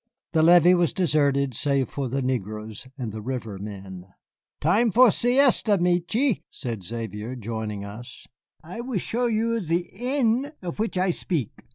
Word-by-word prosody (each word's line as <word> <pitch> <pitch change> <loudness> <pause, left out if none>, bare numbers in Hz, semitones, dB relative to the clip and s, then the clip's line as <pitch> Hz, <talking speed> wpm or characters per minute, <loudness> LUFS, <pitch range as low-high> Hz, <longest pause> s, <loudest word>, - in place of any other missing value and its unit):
The 160 - +3
levee 175 +2 +7
was 175 -2 +2
deserted 140 -6 +1
save 140 +1 0
for 135 -3 -4
the 135 +2 -1
negroes 110 -2 -4
and 120 -5 -4
the 110 +1 -6
river 115 -4 -5
men. 95 -3 -8 0.5
"Time 210 +9 +3
for 245 +2 +6
siesta, 245 -4 +3
Michié," 180 +8 +1
said 115 -7 -6
Xavier, 110 +3 -5
joining 110 -3 -5
us; 110 +4 -10 0.4
"I 180 +8 -7
will 245 -3 -3
show 240 +6 -1
you 230 0 0
ze 175 0 -1
inn 255 +4 0
of 175 +2 -5
which 220 -3 -1
I 185 0 +2
spik. 160 - -4
155 Hz, 155 wpm, -25 LUFS, -, 0.5 s, levee